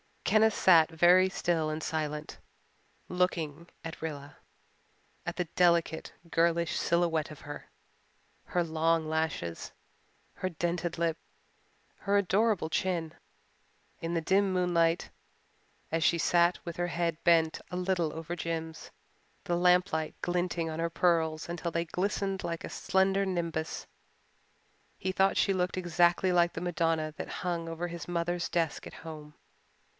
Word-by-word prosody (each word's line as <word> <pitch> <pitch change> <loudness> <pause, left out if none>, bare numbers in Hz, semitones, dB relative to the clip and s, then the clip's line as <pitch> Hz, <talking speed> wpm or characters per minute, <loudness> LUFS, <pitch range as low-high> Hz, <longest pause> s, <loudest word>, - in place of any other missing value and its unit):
Kenneth 220 0 +4
sat 165 -4 +6
very 175 +3 +5
still 170 -4 0
and 155 +1 -4
silent, 150 -1 -3 0.7
looking 170 -3 -1 0.2
at 165 0 -7
Rilla 145 -3 -6 0.9
at - - -3
the 180 - 0
delicate, 170 -1 +1 0.2
girlish 170 0 +2
silhouette 170 -3 +1
of 150 - -11
her, 145 0 -9 0.8
her 175 - 0
long 165 0 +1
lashes, 160 - -2 0.6
her 185 - -2
dented 170 0 -2
lip, 165 -1 0 0.8
her 200 0 +1
adorable 200 -2 +2
chin. 165 -2 -1 0.9
In 165 +1 -3
the 165 - +1
dim 190 +3 +2
moonlight, 175 -2 +1 0.8
as 165 +1 0
she 170 - +4
sat 170 +2 +2
with 170 -1 -6
her 175 0 0
head 170 -2 -1
bent 165 -2 +4
a - - -5
little 180 -3 0
over 165 +1 -5
Jims, 165 -1 -4 0.5
the 175 - 0
lamplight 180 -2 +2
glinting 175 -2 -1
on 160 0 -5
her 165 0 0
pearls 165 -2 +1
until 170 0 -3
they 170 +1 -1
glistened 195 +2 -2
like 170 -1 -3
a - - -5
slender 195 +1 +1
nimbus, 170 -4 -3 1.1
he 190 - -2
thought 190 +1 +2
she 195 - +3
looked 180 -1 -1
exactly 175 +1 +3
like 175 -1 +3
the - - -5
Madonna 165 -3 0
that - - -5 0.2
hung 170 -2 -2
over 165 +2 -4
his 170 -3 -7
mother's 175 0 -1
desk 165 -3 -1
at - - -11
home. 150 -2 -9
170 Hz, 140 wpm, -30 LUFS, 160-180 Hz, 1.1 s, sat